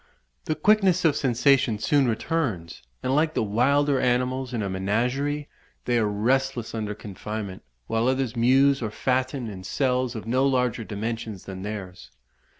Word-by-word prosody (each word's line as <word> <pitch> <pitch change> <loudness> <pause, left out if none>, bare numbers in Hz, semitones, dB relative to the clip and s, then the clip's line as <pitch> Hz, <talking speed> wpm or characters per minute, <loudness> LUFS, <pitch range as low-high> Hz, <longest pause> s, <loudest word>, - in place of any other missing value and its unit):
The 155 - -1
quickness 190 0 +3
of 155 - +4
sensation 125 -2 +2
soon 130 +5 +2
returns, 115 - -2 0.2
and 130 - 0
like 155 +1 +1
the - - +1
wilder 135 +6 +2
animals 125 +1 0
in 115 -4 -2
a - - -2
menagerie, 125 +10 -1 0.4
they 120 -1 +2
are 110 - +2
restless 120 +3 0
under 105 -2 -3
confinement, 105 -1 -6 0.2
while 115 - 0
others 130 -2 0
muse 135 +4 +4
or 110 - -2
fatten 130 +2 -1
in 95 -3 -8
cells 125 +2 0
of 110 - -6
no 130 +3 +1
larger 125 -3 0
dimensions 110 -1 -5
than 95 -1 -7
theirs." 95 -8 -7
120 Hz, 150 wpm, -25 LUFS, 105-135 Hz, 0.4 s, of